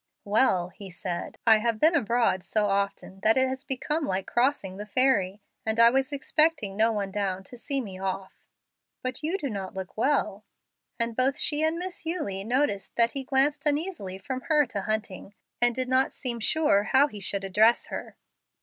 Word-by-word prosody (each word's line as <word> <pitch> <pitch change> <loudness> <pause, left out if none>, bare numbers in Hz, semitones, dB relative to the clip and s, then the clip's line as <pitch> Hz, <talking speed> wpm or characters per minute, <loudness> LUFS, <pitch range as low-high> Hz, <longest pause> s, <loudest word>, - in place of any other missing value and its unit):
"Well," 200 -4 +2
he 195 +2 -11
said, 175 0 -5
"I 225 -2 +7
have 230 0 -1
been 315 +6 +5
abroad 235 - +1
so 210 +4 0
often 200 -1 -2
that 220 +5 +3
it 260 0 +4
has 260 +1 -4
become 295 +3 -2
like 190 -3 -2
crossing 240 -7 0
the 210 +1 -7
ferry, 205 -6 +1 0.2
and 220 +1 -1
I 230 0 +8
was 270 +2 0
expecting 290 -6 +1
no 220 +2 +3
one 200 -3 -2
down 190 -1 -2
to 220 - -12
see 275 +3 -2
me 190 -5 -8
off. 190 0 -5 0.6
But 255 0 -3
you 325 +5 -1
do 295 - -3
not 195 -6 -5
look 190 -1 -6
well;" 225 -4 0 0.5
and 230 -1 -2
both 260 +3 +1
she 300 -1 0
and 315 +1 +1
Miss 360 0 -5
Eulie 305 - -3
noticed 240 -3 -1
that 235 0 +3
he 275 - -4
glanced 280 +3 +1
uneasily 295 - -2
from 255 +7 -5
her 300 -2 +4
to 200 - -3
Hunting, 210 -2 -4 0.3
and 240 -1 +3
did 255 -1 -2
not 260 +1 +2
seem 240 -3 -4
sure 215 -5 +2
how 265 +5 +5
he 215 -8 -8
should 195 0 -1
address 215 +5 +4
her. - - -6
230 Hz, 190 wpm, -27 LUFS, 200-275 Hz, 0.6 s, I